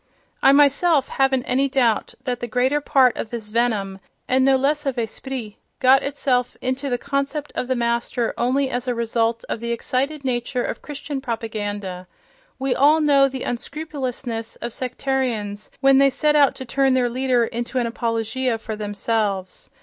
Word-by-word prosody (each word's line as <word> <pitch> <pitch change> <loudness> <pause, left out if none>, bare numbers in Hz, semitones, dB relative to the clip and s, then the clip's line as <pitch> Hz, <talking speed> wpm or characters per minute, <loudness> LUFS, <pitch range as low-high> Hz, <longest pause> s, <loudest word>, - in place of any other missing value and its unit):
I 270 - +7
myself 285 +1 +4
haven't 270 -2 +1
any 270 +3 +1
doubt 240 -5 +1
that 250 -2 -2
the 240 - -4
greater 255 +5 +1
part 260 -4 +4
of 220 - -4
this 225 -3 -5
venom 210 -5 0 0.3
(and 260 +1 +3
no 270 0 +5
less 290 +3 0
of 265 -2 -1
esprit) 235 -1 -4 0.2
got 265 +1 +6
itself 260 -3 -1
into 260 +2 -2
the 245 - 0
concept 280 +2 -3
of 250 - -3
the 260 - 0
Master 235 0 -1
only 265 +3 +1
as 245 0 -3
a 245 - 0
result 230 0 0
of - - -3
the 235 +1 -3
excited 270 +5 -2
nature 245 0 -1
of - - -4
Christian 290 -1 -5
propaganda: 205 -6 -4 0.5
we 270 -1 0
all 300 +3 +5
know 285 -3 +5
the 265 -1 -5
unscrupulousness 250 -4 -4
of 235 -1 -6
sectarians 250 -6 -2
when 270 0 +6
they 275 0 +6
set 300 +3 +1
out 285 -2 +5
to 260 - -7
turn 270 +2 +2
their 250 -1 +2
leader 250 -1 +1
into 240 +3 -4
an 245 - +1
apologia 230 +1 -1
for 220 0 -6
themselves. 205 -2 -2
250 Hz, 170 wpm, -22 LUFS, 230-270 Hz, 0.5 s, I